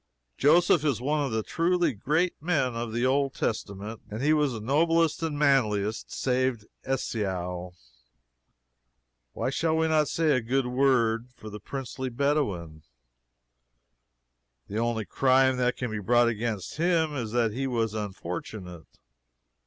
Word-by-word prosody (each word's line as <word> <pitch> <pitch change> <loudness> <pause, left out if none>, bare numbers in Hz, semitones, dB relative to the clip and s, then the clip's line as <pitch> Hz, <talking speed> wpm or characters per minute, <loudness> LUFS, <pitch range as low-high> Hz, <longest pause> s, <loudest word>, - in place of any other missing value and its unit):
Joseph 165 - +4
is 140 -7 +1
one 145 +4 0
of 135 - -2
the 110 0 -1
truly 170 0 +1
great 155 - 0
men 150 -7 +1
of 115 -1 -4
the 120 +2 0
Old 135 +1 +1
Testament. 105 0 -4
And 110 +5 -5
he 150 +2 +4
was 150 -3 +2
the 115 - -5
noblest 165 +8 +2
and 160 -2 -2
the - - -5
manliest, 110 -7 +1
save 130 -3 0 0.3
Esau. 90 -8 -2 1.6
Why 130 - -2
shall 160 +2 0
we 160 0 +2
not 155 -2 +2
say 160 +1 +1
a 130 -3 +2
good 130 +3 0
word 125 -3 +2
for 110 -4 -10
the 105 - -7
princely 130 +3 -5
Bedouin? 120 - -1 1.9
The 105 +2 -3
only 115 -2 -1
crime 130 +1 +3
that 125 0 +1
can 125 -3 -3
be 110 - -3
brought 120 +4 +3
against 110 -2 -3
him 165 -2 +1
is 115 -5 -3
that 115 -3 +1
he 135 +3 -2
was 115 -4 -1
unfortunate. 90 -3 -6
125 Hz, 145 wpm, -27 LUFS, 110-145 Hz, 1.9 s, Joseph